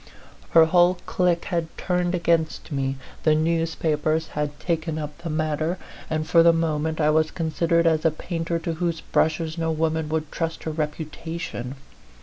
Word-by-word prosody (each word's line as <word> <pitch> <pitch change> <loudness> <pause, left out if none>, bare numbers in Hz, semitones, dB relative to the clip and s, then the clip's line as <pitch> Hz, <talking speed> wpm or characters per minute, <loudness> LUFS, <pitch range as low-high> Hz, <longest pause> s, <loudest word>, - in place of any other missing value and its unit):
Her 165 -1 +7
whole 175 +2 +4
clique 175 -2 +1
had 170 -4 -1
turned 180 -1 0
against 165 -3 0
me, 135 -1 -1 0.2
the 155 -1 +4
newspapers 160 -1 0
had 145 -1 -3
taken 165 -2 -1
up 150 -1 -5
the 170 -1 -5
matter, 155 +2 -1 0.3
and 155 0 -1
for 165 0 +6
the 170 0 +7
moment 160 -1 0
I 150 -1 +4
was 155 0 +3
considered 170 0 +1
as 160 -1 +3
a 160 - +5
painter 165 +1 -3
to 165 0 -3
whose 165 0 -2
brushes 160 +1 0
no 165 0 0
woman 160 0 0
would 155 -1 -2
trust 165 -1 -3
her 160 - -2
reputation. 155 -3 -4
160 Hz, 160 wpm, -24 LUFS, 155-170 Hz, 0.3 s, Her